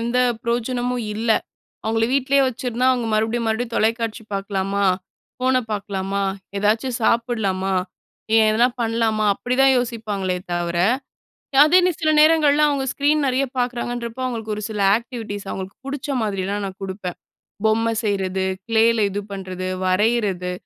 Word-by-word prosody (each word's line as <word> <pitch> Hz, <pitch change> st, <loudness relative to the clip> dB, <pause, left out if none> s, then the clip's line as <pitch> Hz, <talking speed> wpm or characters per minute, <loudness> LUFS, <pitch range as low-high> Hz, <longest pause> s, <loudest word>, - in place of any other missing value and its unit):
எந்த 235 Hz, +2 st, 0 dB, 0.2 s
பிரயோஜனமும் 245 Hz, +1 st, -1 dB
இல்ல. 225 Hz, +2 st, -1 dB, 0.5 s
அவுங்கள 225 Hz, +1 st, +1 dB
வீட்டிலே 275 Hz, +1 st, +3 dB
வச்சிருந்தா 250 Hz, 0 st, -2 dB
அவுங்க 245 Hz, -2 st, -1 dB
மறுபடியும், 225 Hz, +2 st, 0 dB
மறுபடியும் 230 Hz, +1 st, -2 dB
தொலைக்காட்சி 225 Hz, +1 st, 0 dB
பார்க்கலாமா? 195 Hz, 0 st, -1 dB, 0.6 s
ஃபோன 255 Hz, 0 st, +2 dB, 0.2 s
பார்க்கலாமா? 200 Hz, -1 st, -2 dB, 0.4 s
எதாச்சும் 225 Hz, +5 st, +1 dB
சாப்பிட்லாமா? 220 Hz, -5 st, +1 dB, 0.6 s
ஏன் 220 Hz, -1 st, +6 dB
எதனா 235 Hz, +3 st, +4 dB
பண்ணலாமா? 225 Hz, -2 st, +1 dB
அப்பிடிதான் 265 Hz, +4 st, +3 dB
யோசிப்பாங்களே 215 Hz, -6 st, -2 dB, 0.2 s
தவிர, 175 Hz, 0 st, -1 dB, 0.9 s
அதே 325 Hz, +4 st, +5 dB
நீ -, -, +3 dB
சில 310 Hz, -1 st, +2 dB
நேரங்கள்ல 300 Hz, -1 st, +5 dB
அவுங்க 280 Hz, -2 st, 0 dB
ஸ்க்ரீன் 290 Hz, +1 st, +2 dB
நிறைய 260 Hz, +1 st, +1 dB
பார்க்குறாங்கன்றப்போ, 245 Hz, 0 st, -3 dB
அவுங்களுக்கு 225 Hz, -3 st, -3 dB
ஒரு 210 Hz, -, -5 dB
சில 210 Hz, -1 st, -3 dB, 0.2 s
ஆக்டிவிட்டீஸ் 225 Hz, -4 st, -6 dB
அவுங்களுக்கு 190 Hz, +1 st, -6 dB
புடுச்ச 280 Hz, +1 st, -5 dB
மாதிரிலாம் 200 Hz, -1 st, -2 dB
நான் 190 Hz, -1 st, -9 dB
கொடுப்பேன். 190 Hz, -2 st, -5 dB, 0.5 s
பொம்மை 225 Hz, +1 st, +2 dB
செய்றது, 190 Hz, -2 st, -1 dB, 0.2 s
க்ளேல 225 Hz, -1 st, +3 dB
இது 200 Hz, +1 st, -3 dB
பண்றது, 185 Hz, -1 st, -5 dB, 0.2 s
வரையிறது, 190 Hz, -2 st, +1 dB
225 Hz, 130 wpm, -21 LUFS, 200-245 Hz, 0.9 s, ஏன்